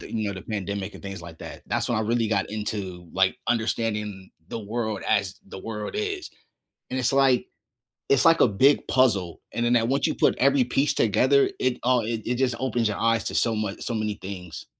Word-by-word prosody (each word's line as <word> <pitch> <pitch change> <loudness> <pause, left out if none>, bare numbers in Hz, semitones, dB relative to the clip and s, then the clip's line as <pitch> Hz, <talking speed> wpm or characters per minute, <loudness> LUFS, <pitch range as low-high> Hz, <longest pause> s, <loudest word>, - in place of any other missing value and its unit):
the - - -10
you 110 -2 -1
know, 100 - -3
the 95 - -8
pandemic 100 -1 -4
and - - -12
things 95 -3 -7
like 85 -1 -10
that. - - -9
That's - - -1
when - - +1
I 110 - +1
really 115 0 +1
got 100 -3 0
into, 100 -5 -4
like, 95 +3 +2
understanding 105 -4 -1 0.2
the - - -4
world 110 -1 -3
as 100 -4 0
the 95 - -9
world 105 +1 -5
is. 405 -3 -3 0.6
And 130 - -1
it's 130 +1 +1
like 135 -2 +3 0.6
it's 135 -2 +4
like 165 0 +6
a - - +7
big 130 +8 +3
puzzle, 100 -10 +2
and 120 - 0
then 120 - +3
that 115 -1 +3
once 140 +2 +2
you - - -1
put - - +3
every 140 0 +4
piece 135 +4 +1
together, 130 +6 +3
it, 130 -1 +1
uh 125 0 +3
it 110 0 -3
it 125 - 0
just 125 -1 +1
opens 120 -3 0
your 105 - -2
eyes 115 0 +2
to - - -3
so 115 -1 +2
mu 105 -2 -2
so 120 - -4
many 105 -2 -1
things. 90 -4 -7
110 Hz, 220 wpm, -25 LUFS, 100-125 Hz, 0.6 s, a